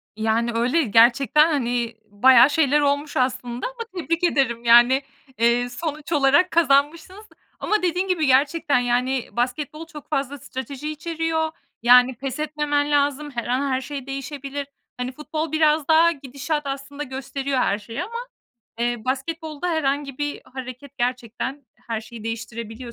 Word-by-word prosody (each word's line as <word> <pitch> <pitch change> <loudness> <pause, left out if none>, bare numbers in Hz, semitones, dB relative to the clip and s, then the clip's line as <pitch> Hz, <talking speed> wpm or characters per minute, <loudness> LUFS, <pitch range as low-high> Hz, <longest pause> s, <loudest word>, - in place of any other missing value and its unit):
Yani, 220 +2 0
öyle, 245 +8 +2
gerçekten, 250 +7 +4
hani, 240 -5 -1
bayağı 245 +5 +6
şeyler 295 -1 +3
olmuş 285 +1 0
aslında 250 -1 -1
ama - - -7 0.2
tebrik 335 +1 -2
ederim. 265 -8 +1
Yani, 240 +3 +6 0.4
eee, 235 +1 +2
sonuç 305 +4 -5
olarak 290 +5 +4
kazanmışsınız. 330 +6 +1 0.3
Ama 425 0 0
dediğin 360 +2 0
gibi 355 -4 +1
gerçekten, 280 +1 +3
yani, 245 +1 0
basketbol 290 +6 -3
çok 300 -3 -12
fazla 280 -1 -2
strateji 265 +3 -6
içeriyor. 320 +1 -2 0.3
Yani, 250 +1 +6
pes 265 +2 -5
etmemen 295 -1 -1
lazım. 290 0 +1
Her 240 -3 -4
an 265 +3 0
her 260 0 0
şey 275 -1 -6
değişebilir. 275 +1 -5 0.3
Hani, 250 +1 -3
futbol 310 +3 -4
biraz 310 -1 +2
daha 330 +1 +5
gidişat 285 +1 -4
aslında 280 +1 -5
gösteriyor 270 0 -4
her 205 -4 +1
şeyi 230 +9 -5
ama, 450 +5 -9 0.6
eee, 240 +1 0
basketbolda 310 +5 -3
herhangi 285 -4 -1
bir 290 0 -3
hareket 255 +1 -9
gerçekten 250 +2 -3 0.2
her 225 -2 -2
şeyi 220 0 -11
değiştirebiliyor 230 +1 -6
275 Hz, 140 wpm, -23 LUFS, 245-300 Hz, 0.6 s, bayağı